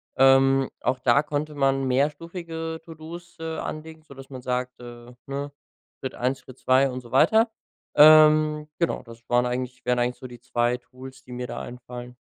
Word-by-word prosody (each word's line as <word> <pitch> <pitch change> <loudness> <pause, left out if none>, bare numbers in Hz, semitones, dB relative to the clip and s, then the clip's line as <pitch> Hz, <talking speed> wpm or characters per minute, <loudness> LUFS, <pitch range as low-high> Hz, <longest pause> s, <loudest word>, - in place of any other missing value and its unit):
Ähm, 135 0 +5
auch 125 +1 -1
da 130 +3 +4
konnte 150 0 -3
man 135 -1 +1
mehrstufige 160 +4 -2
To-do's, 165 +1 -11
äh, 160 0 -4
anlegen, 155 0 -7
sodass 135 -3 -13
man 130 -2 -8
sagt, 125 0 -3
äh, 120 0 -11
ne, 140 +1 -5 0.5
Schritt 130 - -5
1, 130 +2 -1
Schritt 130 0 -14
2 130 +1 +3
und 130 0 -5
so 120 - -15
weiter. 220 - +4 0.4
Ähm, 155 0 +6
genau, 170 - 0
das 115 -1 -13
waren 120 0 +2
eigentlich 125 0 -4
wären 125 0 +1
eigentlich 120 0 0
so 130 +1 -10
die 120 -1 -12
2 120 0 0
Tools, 130 +1 -13
die 125 - -11
mir 125 0 -5
da - - -6
einfallen. 125 0 -9
135 Hz, 175 wpm, -25 LUFS, 125-155 Hz, 0.5 s, Ähm